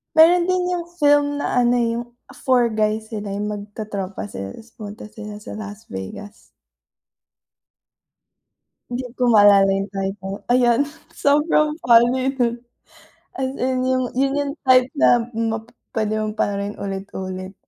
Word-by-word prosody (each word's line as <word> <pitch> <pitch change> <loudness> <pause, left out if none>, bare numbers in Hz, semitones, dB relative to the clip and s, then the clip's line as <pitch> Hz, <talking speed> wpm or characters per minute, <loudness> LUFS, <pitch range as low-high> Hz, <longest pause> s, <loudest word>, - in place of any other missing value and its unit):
Meron 340 +2 +7
din 365 +1 +1
yung 345 -1 -4
film 290 0 +3
na 250 -3 +1
ano 240 0 +3
yung 235 0 -1 0.4
Four 245 -4 +3
Guy 215 0 +1
sila 215 -2 -6
yung 205 +1 -3
magtotropa 205 - -5
sila 95 0 -6
tas 230 +1 -13
pumunta 210 -1 -9
sila 210 -1 -9
sa 210 - -9
Las 210 0 -9
Vegas. 95 - -8 2.5
Hindi 245 +1 -4
ko 255 - -2
maalala 205 -3 +6
yung 195 +1 -3
title, 195 0 -4
ayon 245 0 +4 0.3
sobrang 300 +1 +2
funny 245 +3 +4
nun. 240 -3 0 0.8
As 260 0 -1
in 255 0 0
yung 255 0 +1
yun 275 +1 +2
yung 285 -1 -1
type 255 -1 +5
na - - +5 0.2
p 225 -1 -3 0.3
pwede 215 -1 0
mo 215 0 -2
pa 205 - 0
rin 200 +1 -3
ulit-ulit. 190 -1 -5
225 Hz, 140 wpm, -21 LUFS, 205-255 Hz, 2.5 s, Meron